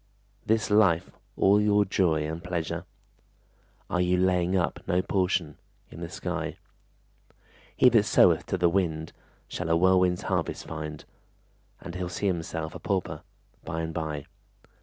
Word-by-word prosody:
This 110 -1 0
life 95 -6 +3 0.3
all 100 +2 +5
your 105 -1 +3
joy 85 -5 +1
and 80 +3 -5
pleasure? 85 -3 -3 1.0
Are 90 - 0
you 90 0 +2
laying 90 0 +2
up 90 - -1
no 90 +1 +1
portion 90 -5 -1 0.3
In - - -10
the - - -5
sky? - - -4 1.2
He - - +6
that 110 -3 +4
soweth - - +4
to - - -1
the 90 -1 +3
wind 85 -3 -1 0.3
Shall 90 -2 -4
a 85 - +4
whirlwind's 90 0 +3
harvest - - -2
find, 75 -1 -6 0.8
And 85 - -8
he'll 90 -1 -4
see 90 - -4
himself 80 -3 -2
a - - -8
pauper 90 -6 -2 0.4
By 80 0 -3
and 80 0 -4
by. 75 -3 -4
90 Hz, 145 wpm, -27 LUFS, 80-95 Hz, 1.2 s, He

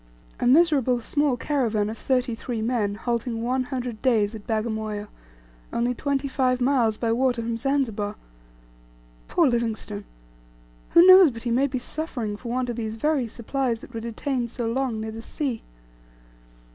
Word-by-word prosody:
A - - +1
miserable 270 -4 +4
small 285 +2 0
caravan 230 -7 0
of 220 - -4
thirty 250 -1 0
three 230 0 -4
men 220 -3 0
halting 235 0 -2
one 255 +2 0
hundred 245 -4 -4
days 225 -5 +2
at 215 -2 -10
Bagamoyo, 220 -2 -2 0.6
only 240 +1 0
twenty 275 +2 -1
five 255 -2 +1
miles 245 -4 +2
by 230 0 0
water 245 0 +1
from 230 0 -2
Zanzibar! 230 -5 -1 1.1
Poor 340 -3 +3
Livingstone! 220 -4 -2 0.9
Who 340 - +9
knows 370 -2 +9
but 230 -3 -8
he 240 - -1
maybe 260 +2 +1
suffering 245 -6 -4
for 235 +3 -8
want 250 0 -1
of 235 - -7
these 220 -1 -3
very 275 +1 0
supplies 235 +1 -2
that - - -13
were 225 - -3
detained 235 +2 -3
so 240 0 -4
long 235 -1 -1
near 220 0 -4
the 225 +1 -7
sea. 255 -1 -3
240 Hz, 160 wpm, -25 LUFS, 225-265 Hz, 1.1 s, Who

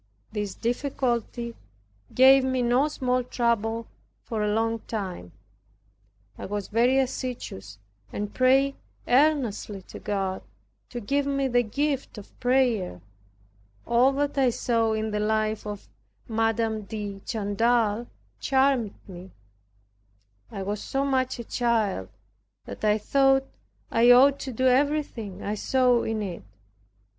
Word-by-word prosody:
This 205 -2 -4
difficulty 240 -1 -2 0.6
gave 265 +1 +7
me 260 -1 0
no 245 +4 +3
small 255 -4 -1
trouble, 230 -2 -1 0.4
for 220 -2 -3
a 210 0 +1
long 225 +1 0
time. 185 - -5 1.1
I - - -5
was 205 0 -4
very 240 +4 +3
assiduous 245 - -3 0.3
and 210 0 -4
prayed 270 +2 +3 0.3
earnestly 245 -8 +1
to - - -11
God 195 -2 -2 0.5
to 240 - -6
give 280 +6 0
me 275 -1 0
the 245 -1 +3
gift 275 +3 -2
of 205 - -11
prayer. 245 - +1 0.9
All 240 +3 +4
that 285 0 -1
I 260 -2 +4
saw 230 -1 0
in 220 0 -2
the 210 - -1
life 215 0 0
of 205 -1 -7 0.4
M. 225 0 +1 0.3
de 205 -1 -6
Chantal 225 +1 0 0.3
charmed 265 -5 +2
me. 185 -1 -10 1.2
I 195 - -5
was 205 +2 -3
so 270 +1 -1
much 260 -2 0
a 235 - -6
child, 225 - 0 0.6
that - - -9
I 210 0 +3
thought 270 +4 +3 0.5
I 235 +1 +4
ought 270 +3 +7
to 265 - -5
do 255 +2 -1
everything 255 -7 0
I 205 - -2
saw 250 +2 +2
in 220 -1 -2
it. 180 -4 -6
235 Hz, 130 wpm, -26 LUFS, 210-260 Hz, 1.2 s, gave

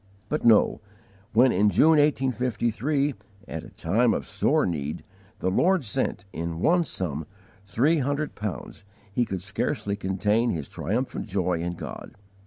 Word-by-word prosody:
But 150 - -1
no. 115 -3 +4 0.5
When, 125 +3 +5
in 105 +3 +3
June, 155 +8 +5
1853, 130 0 +1 0.3
at 80 - -5
a - - -11
time 110 +8 +1
of - - -3
sore - - +2
need, 75 -1 -3 0.4
the 95 - +1
Lord 180 - +3
sent, 100 -3 -2
in 85 0 -4
one 170 - +3
sum, 80 - -3 0.4
three 140 - +2
hundred 145 +3 -1
pounds, 105 -1 -6 0.3
he 120 +3 +2
could 95 -4 -4
scarcely 100 0 -1
contain 105 +4 +1
his 80 -8 -2
triumphant 120 +8 -3
joy 90 -4 0
in 85 +1 -2
God. - - -8
105 Hz, 145 wpm, -26 LUFS, 90-135 Hz, 0.5 s, When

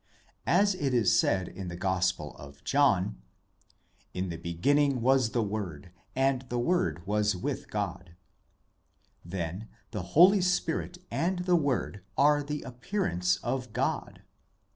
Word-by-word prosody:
As 200 0 +4
it 140 -8 -1
is 115 -5 +4
said 95 -2 +1
in 95 0 -7
the 85 - -5
Gospel 90 -4 -1
of 70 0 -13
John, 95 - +2 0.9
'In 90 0 -2
the 85 - -4
beginning 135 - +1
was 130 -1 +3
the 115 0 0
Word, 95 -6 -5 0.2
and 135 -1 +2
the 120 - -2
Word 120 - 0
was 105 0 +1
with 90 - -4
God 85 -1 -4 0.5
'; - - -42
then 90 +4 -4 0.2
the 105 - -3 0.2
Holy 190 +4 +8
Spirit 180 -1 0
and 180 +1 -1
the 180 -1 +4
Word 140 - 0 0.2
are 145 +1 +5
the 150 +1 -4
appearance 125 - -1
of 125 -4 -3
God. 125 +3 -2
120 Hz, 140 wpm, -29 LUFS, 90-145 Hz, 0.9 s, Holy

